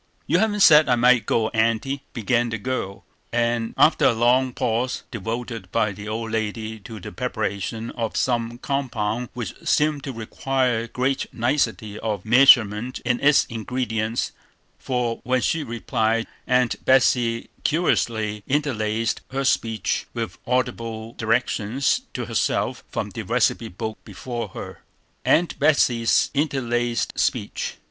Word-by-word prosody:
"You - - +2
haven't 210 -2 +1
said 155 -5 +7
I 125 - +5
might 120 0 +4
go, 110 -1 +1
Aunty," 115 +4 0
began 120 +1 0
the 115 - -2
girl, 105 -4 -4 0.3
after 120 +5 +2
a - - +5
long 125 +3 +3
pause 120 +2 -1
devoted 115 -3 -5
by 110 -2 +1
the 105 +2 -9
old 110 +1 -3
lady 110 0 -3
to 110 +2 -9
the - - -8
preparation 110 0 -3
of 115 -2 -3
some 120 -2 0
compound 120 -4 -2
which 120 -6 -4
seemed 150 -2 +1
to 135 - -3
require 125 0 -1
great 130 +3 -1
nicety 115 -4 -1
of 105 -3 -3
measurement 120 -1 +5
in 120 0 +1
its 145 +1 +5
ingredients; 115 -1 -2 0.5
for 125 -3 -2
when 130 +1 +1
she 160 - 0
replied, 115 -2 -1 0.2
Aunt 125 -1 +1
Betsey 120 -3 +3
curiously 110 -10 0
interlarded 115 -6 0
her 135 +1 -2
speech 110 -5 0
with 115 -1 -4
audible 115 -3 -2
directions 115 +2 0
to - - -3
herself - - -1
from - - -3
the - - -5
receipt 90 - 0
book 110 -1 -4
before 120 -2 -5
her. - - -9 0.4
[Illustration: - - +5
AUNT 175 - -6
BETSEY'S 125 -6 +3
INTERLARDED 120 -5 -1
SPEECH. - - -1
120 Hz, 135 wpm, -23 LUFS, 110-130 Hz, 0.5 s, said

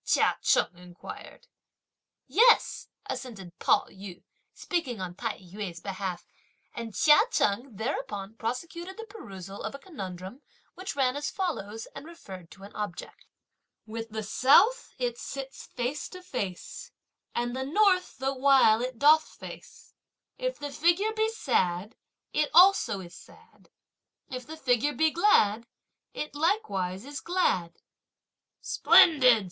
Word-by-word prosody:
Chia - - +2
Cheng - - +2
inquired. 180 - -11 0.8
"Yes!" 470 +3 +4 0.2
assented 225 -10 -7
Pao - - +3
yü, 190 -2 -11 0.3
speaking 310 - -3
on 185 -2 -5
Tai 225 +5 -4
yü's 185 -1 -7
behalf; 190 -2 -5 0.5
and 230 -3 -7
Chia 300 -1 +6
Cheng 240 - 0
thereupon 205 -3 -4
prosecuted 335 - -5
the 450 - -6
perusal 200 - -10
of - - -5
a - - -6
conundrum, 195 - -8 0.3
which 370 -3 -6
ran 260 -2 +1
as 290 0 -2
follows, 225 - -4
and 305 - -9
referred 190 - -11
to 195 - -15
an 200 - -12
object; 205 -5 -6 0.6
With 225 +1 -6
the 220 0 -4
South, 300 - +4
it 240 -2 -2
sits 270 0 -7
face 255 +4 -4
to 365 0 -11
face, 200 - -5 0.4
And 240 +1 -1
the 265 - -2
North, 370 +5 +2
the 270 +1 -1
while, 260 -4 +5
it 255 -1 -4
doth 305 +4 +5
face; - - -12 0.4
If - - -3
the 290 0 -6
figure 345 +9 +2
be 440 0 +1
sad, 200 - -1 0.4
it 300 -1 +1
also 360 - +6
is 175 -1 -11
sad, - - -18 0.6
If 255 -1 -6
the 315 +1 -8
figure 265 0 +1
be 315 +1 +2
glad, 235 - +3 0.4
it 300 - -5
likewise 215 - -1
is 285 -1 -6
glad! 185 - 0 0.9
"Splendid! 255 -8 +6
255 Hz, 135 wpm, -28 LUFS, 200-315 Hz, 0.9 s, Chia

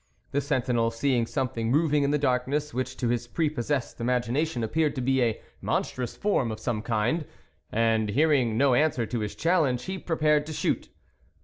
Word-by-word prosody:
The 145 - +1
sentinel, 125 -5 +1
seeing 120 0 0
something 115 -5 -2
moving 150 +2 +3
in 140 - +2
the 150 - +2
darkness 140 +2 0
which 130 0 -3
to 120 - -1
his 120 0 -1
prepossessed 145 -3 -2
imagination 125 +3 0
appeared 150 +7 0
to 130 - -2
be 130 +1 +2
a 115 -3 +1 0.2
monstrous 125 -2 -2
form 140 - +1
of 110 - -6
some 110 -1 -2
kind, 115 +8 0 0.5
and 110 -1 +2
hearing 130 -3 +2
no 135 0 +4
answer 130 -3 +2
to 120 +1 -3
his 105 -1 -4
challenge, 155 -8 +1
he 190 0 -4
prepared 150 -3 +1
to 160 - -5
shoot. - - -1
130 Hz, 175 wpm, -27 LUFS, 115-150 Hz, 0.5 s, no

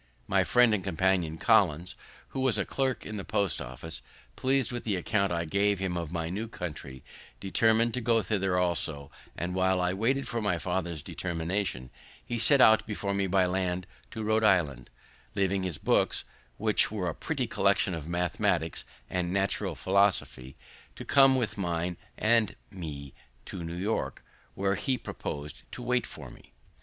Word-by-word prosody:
My - - +2
friend 125 -2 +4
and 100 -3 0
companion 90 -3 +1
Collins, 80 +2 +3 0.4
who - - -5
was 130 -5 +2
a 100 - 0
clerk 135 -2 -1
in 105 - -5
the 100 - -4
post 100 -2 0
office, 65 +2 -7 0.3
pleas'd 135 0 +1
with 120 -1 -4
the 105 -4 0
account 100 +2 0
I 85 -1 -1
gave 100 +4 +1
him 95 -1 -2
of 85 -3 -3
my 85 -1 -3
new 105 +5 -3
country, 75 - -7 0.4
determined 110 +4 +2
to 125 - -1
go 115 -1 +2
thither 95 -1 0
also; 80 -5 -1 0.3
and, 90 +1 -3
while 95 0 +2
I 90 0 +1
waited 130 +8 0
for 115 - -2
my 105 -5 +1
father's 85 -3 -3
determination, 85 -5 -3 0.3
he 120 - -3
set 135 +4 +5
out 110 -2 +6
before 100 -2 -2
me 100 -1 0
by 95 0 +3
land 90 0 -1 0.2
to 110 - -5
Rhode 110 +1 +2
Island, 80 - +2 0.5
leaving 95 0 +1
his 90 -5 -3
books, - - +1 0.3
which - - +4
were 100 -4 -3
a 85 - -1
pretty - - -2
collection 95 - +2
of 80 -1 -5
mathematicks 85 0 0 0.2
and 90 -1 -2
natural 100 -2 0
philosophy, 90 -5 +1 0.4
to - - -8
come 135 -1 +6
with 115 -5 -1
mine 85 -1 -1 0.2
and 110 -1 +2 0.2
me 75 -8 -7 0.3
to 90 - -6
New 85 +1 -5
York, 105 +5 -2 0.3
where 95 0 +1
he 130 +5 0
propos'd 75 -9 -6
to 125 - -6
wait 125 0 0
for - - -10
me. - - -17
95 Hz, 170 wpm, -29 LUFS, 85-110 Hz, 0.5 s, out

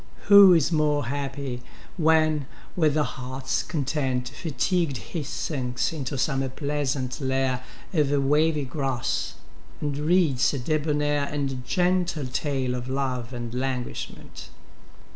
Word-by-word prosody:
Who 200 -2 +10
is 165 -1 +3
more 150 -3 +2
happy, 135 -1 -4 0.3
when, 155 -4 +3 0.3
with 155 -4 +2
heartâs 130 -2 -2
content, 135 -4 -1
Fatigued 155 +1 -1
he 135 - -5
sinks 135 -2 -2
into 140 -3 -4
some 135 0 0
pleasant 140 -3 -2
lair 130 -1 0 0.3
Of 150 -5 +2
wavy 150 +2 +2
grass, 135 -3 -2 0.4
and 145 -1 -2
reads 150 -4 +2
a - - -1
debonair 145 +1 0
And 140 -3 -3
gentle 175 +2 +1
tale 130 -1 -1
of 125 0 -4
love 130 -3 -2
and 120 -2 -5
languishment? 125 -1 -5
140 Hz, 115 wpm, -25 LUFS, 130-155 Hz, 0.4 s, Who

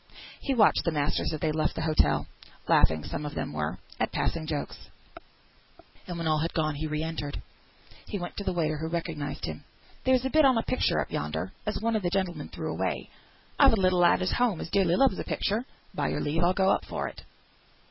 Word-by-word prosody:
He 275 - -1
watched 215 -4 +5
the 170 - +1
masters 145 -1 0
as 155 -2 -4
they 155 - +1
left 155 0 0
the 160 - -2
hotel 155 -1 +2 0.4
(laughing, 80 -1 +4
some 145 - -4
of 145 0 -5
them - - -3
were, 75 0 -2 0.2
at - - 0
passing 160 -2 -1
jokes), 150 -2 -5 1.2
and 175 - -4
when 165 - -3
all 155 -1 +2
had 165 +2 -2
gone, 155 -2 +1
he 155 +2 -3
re 155 0 -2
entered. 160 -3 -4 0.7
He 205 - -3
went 175 -2 -6
to 200 - -3
the 190 - 0
waiter, 155 -4 0
who 160 - -2
recognised 160 -3 -3
him. - - -6 0.4
"There's 260 -1 +3
a 265 - -1
bit 310 0 +5
on 260 -4 +5
a 225 - +1
picture 165 - +1
up 75 - -3
yonder, 80 +5 -3 0.2
as 210 - -1
one 230 +1 0
o' - - +3
the 180 -3 -1
gentlemen 185 -2 -2
threw - - -4
away; - - -2 0.5
I've 275 -4 +7
a 220 - +2
little 185 -1 +3
lad 175 +1 +5
at 185 - +1
home 240 -8 +1
as - - -6
dearly 185 -3 +3
loves 265 -3 +3
a - - -2
picture; 215 +5 -1 0.3
by - - -1
your - - -1
leave 160 +3 0
I'll 175 +1 +4
go 190 -1 +4
up - - +1
for - - -3
it." - - -9
170 Hz, 225 wpm, -28 LUFS, 155-200 Hz, 1.2 s, I've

